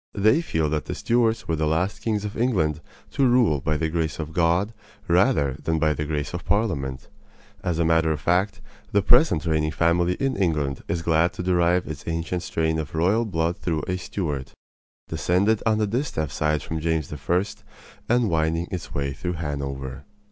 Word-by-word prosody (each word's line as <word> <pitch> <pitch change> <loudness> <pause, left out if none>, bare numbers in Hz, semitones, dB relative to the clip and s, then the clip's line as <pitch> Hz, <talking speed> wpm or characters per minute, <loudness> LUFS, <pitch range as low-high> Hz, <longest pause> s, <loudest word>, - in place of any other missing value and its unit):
They 110 +9 +4
feel 80 - 0
that 75 -3 -1
the - - -4
Stuarts 115 -2 +1
were 80 - +1
the 80 0 0
last 85 +6 0
kings 105 -2 -1
of 105 - -5
England 85 - +1 0.3
to 135 -2 +2
rule 115 - +3
by 75 +2 0
the 80 - 0
grace 80 -2 -1
of 80 -1 -5
God 85 +6 +2 0.3
rather 70 -2 +3
than 80 0 +1
by 80 -1 +2
the 75 - -3
grace 75 +1 -3
of 85 -1 -4
Parliament. 70 - -1 0.6
As 90 -3 -1
a 85 - +2
matter 80 0 +3
of 75 - -1
fact, 90 +5 +1 0.3
the 100 -1 +3
present 120 - +4
reigning 80 -1 +1
family 85 +2 +2
in 135 +4 -1
England 75 -8 0
is 85 -1 -2
glad 85 +1 +2
to 90 - -5
derive 90 0 +2
its 75 -2 -7
ancient 85 +2 -2
strain 80 -1 0
of 80 +1 -5
royal 95 +8 +2
blood 85 -1 -1
through 80 -3 -1
a 90 - 0
Stuart 75 -7 -4 0.5
descended 90 +7 +1
on 110 -1 +3
the 110 - +2
distaff 105 - -2
side 75 0 0
from 80 - -4
James 80 -2 -1
I., 85 +6 +1 0.7
and 120 -1 +3
winding 80 +1 0
its 90 - -5
way 70 -1 -1
through 90 +6 -3
Hanover. 70 -4 -4
85 Hz, 185 wpm, -24 LUFS, 75-95 Hz, 0.7 s, They